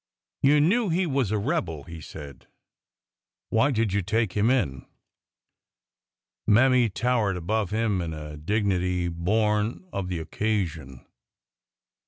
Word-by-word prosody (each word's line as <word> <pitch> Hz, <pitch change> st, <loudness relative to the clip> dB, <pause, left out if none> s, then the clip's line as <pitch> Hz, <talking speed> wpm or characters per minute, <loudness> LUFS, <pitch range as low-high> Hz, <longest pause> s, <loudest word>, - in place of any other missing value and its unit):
You 145 Hz, +2 st, +5 dB
knew 200 Hz, +8 st, +3 dB
he 180 Hz, +3 st, +1 dB
was 135 Hz, -, 0 dB
a 110 Hz, -, 0 dB
rebel," 100 Hz, -, -2 dB
he 85 Hz, 0 st, -10 dB
said. 70 Hz, -4 st, -10 dB, 1.0 s
Why 115 Hz, +6 st, +3 dB
did 115 Hz, -6 st, 0 dB
you 100 Hz, -, +2 dB
take 105 Hz, +1 st, 0 dB
him 105 Hz, +2 st, +2 dB
in? 70 Hz, -, 0 dB, 0.8 s
" -, -, -59 dB
Mammy 125 Hz, +2 st, +5 dB
towered 110 Hz, -3 st, 0 dB
above 105 Hz, +3 st, -1 dB
him 110 Hz, -3 st, 0 dB
in 85 Hz, -1 st, -4 dB
a 75 Hz, -1 st, -7 dB
dignity 90 Hz, 0 st, 0 dB
born 105 Hz, -, 0 dB
of 95 Hz, -2 st, -3 dB
the 90 Hz, -1 st, -3 dB
occasion. 80 Hz, -, -3 dB
105 Hz, 130 wpm, -26 LUFS, 85-115 Hz, 1.0 s, You